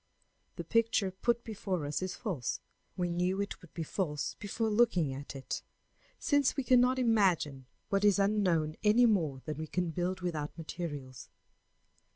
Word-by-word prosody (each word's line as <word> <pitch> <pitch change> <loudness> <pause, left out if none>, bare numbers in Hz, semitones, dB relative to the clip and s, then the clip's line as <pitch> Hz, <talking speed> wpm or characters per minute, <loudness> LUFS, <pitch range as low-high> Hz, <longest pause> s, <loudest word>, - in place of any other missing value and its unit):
The - - -5
picture 230 -4 +2
put 235 +5 0
before 190 -7 -3
us 145 +4 -2
is 185 0 -3
false; 170 - -3 0.4
we 175 -1 0
knew 180 +3 0
it 200 - -3
would 175 - -15
be 165 - -2
false 150 -3 -2
before 220 +2 -1
looking 195 - +3
at 140 +1 -7
it, 135 - -4 0.6
since 285 -2 +2
we 275 - 0
cannot 250 +1 +4
imagine 185 - +2 0.2
what 195 0 +1
is 205 -1 +5
unknown 185 -7 +2
any 220 +3 +6
more 160 - +1
than 155 -1 -4
we 155 - -4
can 175 +1 -1
build 180 +2 -2
without 155 -4 -3
materials. 145 -6 -6
185 Hz, 160 wpm, -32 LUFS, 155-215 Hz, 0.6 s, any